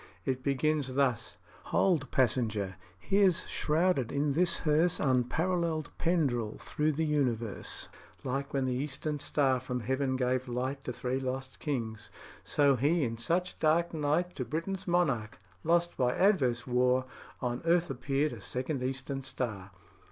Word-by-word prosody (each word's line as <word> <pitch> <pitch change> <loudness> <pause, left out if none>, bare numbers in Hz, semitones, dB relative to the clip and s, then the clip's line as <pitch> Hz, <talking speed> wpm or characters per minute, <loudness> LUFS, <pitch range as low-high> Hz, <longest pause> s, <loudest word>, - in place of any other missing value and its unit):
It 130 -1 -1
begins 140 0 0
thus: 130 -5 +1 0.3
"Hold, 160 -8 +2
passenger! 110 -6 +1 0.2
here's 195 - +2
shrouded 155 -5 +1
in 145 0 +1
this 175 +4 +2
hearse 160 +2 +3
Unparalleled 155 +5 0
Pendrell 135 -11 +1
thro' 150 +1 -1
the 155 +1 0
universe. 120 -8 -1 0.4
Like 135 +2 -2
when 135 -1 0
the 130 - 0
eastern 145 +3 -2
star 135 -3 +2
from 125 0 -4
heaven 130 +3 0
gave 130 0 0
light 130 +3 -3
To - - -2
three 125 +2 -2
lost 130 0 -4
kings, 115 -7 -3 0.3
so 140 -2 +3
he 150 +6 +2
in 115 -2 -2
such 175 +9 -1
dark 165 +2 +2
night 160 +4 0
To 130 - -1
Britain's 165 +10 -4
monarch, 135 - +1 0.3
lost 170 +1 +2
by 125 -1 +2
adverse 135 - +3
war, 125 +1 +2 0.3
On 120 -1 -2
earth 170 -1 +2
appeared 140 +3 0
a - - -9
second 130 +2 -3
eastern 135 +1 -3
star." 110 -7 -4
135 Hz, 145 wpm, -31 LUFS, 125-155 Hz, 0.4 s, hearse